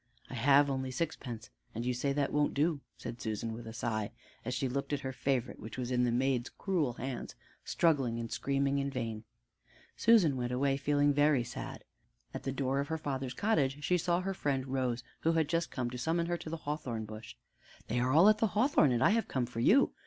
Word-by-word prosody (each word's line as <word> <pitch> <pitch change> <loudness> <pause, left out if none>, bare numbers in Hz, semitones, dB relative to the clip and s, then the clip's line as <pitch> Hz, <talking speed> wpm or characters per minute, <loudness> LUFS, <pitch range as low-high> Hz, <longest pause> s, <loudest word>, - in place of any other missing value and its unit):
"I - - -6
have 140 +1 +5
only 130 -1 -2
sixpence 130 -5 -4 0.2
and 115 +2 -3
you 125 - +1
say 140 +3 -1
that 140 0 0
won't 150 0 +1
do," 150 0 +1 0.2
said 120 0 -7
Susan 110 +1 -3
with 115 0 -8
a - - -6
sigh, 110 -2 -2 0.3
as 125 +2 -3
she 135 - 0
looked 140 +3 -3
at 140 - -1
her 130 -1 -4
favorite 130 -2 -1
which 110 +3 -8
was 125 -1 -3
in 125 0 +2
the 120 - +1
maid's 125 0 +1
cruel 170 -10 -1
hands, 125 +1 -5 0.3
struggling 135 -8 +1
and 115 -1 -5
screaming 140 0 0
in 140 0 -1
vain. 115 -4 -4 0.7
Susan 190 - +5
went 125 0 -2
away 135 +2 +1
feeling 145 +1 +2
very 145 -3 +3
sad. 120 - -7 0.5
At - - -5
the 135 - -3
door 135 0 0
of 140 - -1
her 160 - -2
father's 135 -4 -3
cottage 150 -10 +1
she 180 +2 +2
saw 175 +1 +1
her 195 +1 -2
friend 140 -7 -1
Rose, 125 -2 -1 0.2
who 165 - +2
had 160 -2 +2
just 165 +2 0
come 120 -2 -3
to 125 - -6
summon 165 +5 0
her 175 0 -1
to 160 - -8
the 165 - -3
hawthorn 145 -8 -4
bush. 110 +1 -9 0.5
"They 120 +2 0
are 125 +1 +1
all 165 +8 +7
at 215 0 +5
the 225 - +3
hawthorn, 220 - +4
and 120 -2 +2
I - - +5
have 225 +1 +1
come 130 -2 -1
for 120 -1 -6
you. 230 - +5
135 Hz, 220 wpm, -32 LUFS, 120-150 Hz, 0.7 s, all